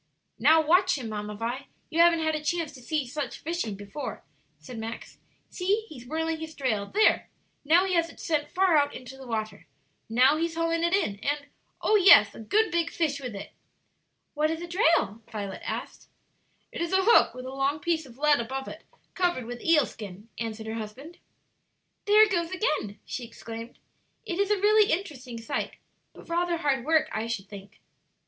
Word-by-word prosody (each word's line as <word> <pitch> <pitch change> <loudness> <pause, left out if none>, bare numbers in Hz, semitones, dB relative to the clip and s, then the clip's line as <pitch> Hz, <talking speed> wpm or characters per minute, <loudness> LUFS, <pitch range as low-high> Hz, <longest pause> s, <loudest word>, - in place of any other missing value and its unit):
"Now, 315 +6 +5
watch 365 +2 +4
him, 240 -4 -5
Mamma 210 0 -5
Vi; 240 +5 -4 0.2
you 325 - -1
haven't 335 -1 +5
had 315 0 +1
a 305 -1 -3
chance 330 0 -1
to 265 -3 -13
see 295 +4 -1
just 250 - -11
such 290 -4 -3
fishing 325 - -3
before," 205 +8 -7 0.3
said 190 +11 -9
Max. 225 +1 -7 0.3
"See, 405 +4 0
he's 250 -5 -11
whirling 320 +2 -2
his 320 0 -7
drail; 215 -7 -1
there! 435 +2 +3 0.3
now 335 +6 +4
he 380 - -1
has 335 -1 +3
sent 305 -3 0
it - - -24
far 370 -3 +3
out 285 0 +1
into 255 +1 -9
the 265 -1 -11
water. 215 -8 -4 0.4
Now 255 +6 +4
he's 330 0 -1
hauling 330 0 0
it 340 +2 +3
in, 270 - 0
and 290 +4 -2 0.4
oh 430 - +5
yes, 345 - +7
a - - -11
good 410 - +1
big 340 0 +1
fish 300 -4 -1
with 250 -6 -6
it." 200 - -8 0.8
"What 305 +1 +1
is 325 +1 -3
a - - -6
drail?" 330 - +2
Violet 200 -3 -5
asked. - - -6 0.6
"It - - -5
is 340 +2 -2
a 380 0 +4
hook 465 - +5
with 255 0 -7
a 260 - -6
long 275 +2 0
piece 320 -2 -1
of 240 -1 -15
lead 295 -1 +4
above 265 +3 -4
it - - -9 0.3
covered 350 -9 0
with 240 +1 -7
eel 315 -5 +4
skin," 205 +1 -10
answered 225 -1 -4
her 220 - -4
husband. 260 +11 -9 0.9
"There 420 +1 +7
it 430 - +2
goes 340 -3 0
again!" 305 - -1
she 255 - -5
exclaimed. 230 0 -9 0.5
"It 350 +1 -3
is 400 0 +2
a 420 - +3
really 420 +1 +4
interesting 275 -10 -3
sight, 230 - -3 0.4
but - - -14
rather 345 0 0
hard 275 -6 0
work, 315 0 +3
I 220 +1 -2
should 210 -4 -4
think." 200 0 -12
295 Hz, 195 wpm, -27 LUFS, 230-340 Hz, 0.9 s, yes